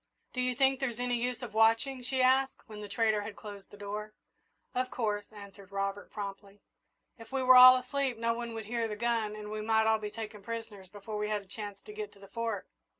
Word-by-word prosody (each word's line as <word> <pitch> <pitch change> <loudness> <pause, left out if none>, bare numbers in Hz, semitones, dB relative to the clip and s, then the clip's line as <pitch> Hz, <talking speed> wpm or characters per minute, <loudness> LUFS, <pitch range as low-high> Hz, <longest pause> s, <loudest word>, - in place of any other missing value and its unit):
"Do 255 - -1
you 250 0 0
think 270 0 +3
there's 245 -4 -2
any 245 0 0
use 250 +1 -2
of 230 -3 -6
watching?" 225 +4 +3
she 255 +1 0
asked, 265 +1 +3
when 210 -2 -9
the 205 - -7
trader 215 0 +2
had 205 0 -7
closed 205 -2 -10
the 205 - -13
door. 210 +1 -5 0.6
"Of 255 0 0
course," 210 -4 -2
answered 200 -2 -12
Robert, 195 0 -3
promptly. 200 -1 -7 0.6
"If 225 +1 -12
we 265 -1 0
were 255 0 +8
all 255 0 +11
asleep, 255 0 -1
no 230 0 +1
one 235 -1 -5
would 220 -1 -5
hear 230 +1 -1
the 210 - -4
gun 225 -1 0
and 210 0 -7
we 215 0 -3
might 220 0 +3
all 220 0 +3
be 210 -1 -4
taken 215 -1 -7
prisoners 215 -3 -7
before 210 +2 -6
we 210 0 -1
had 210 -1 -1
a - - -22
chance 205 0 -8
to 425 - -10
get 425 0 -5
to - - -19
the 195 - -13
Fort." 230 -3 -3
220 Hz, 230 wpm, -31 LUFS, 205-245 Hz, 0.6 s, all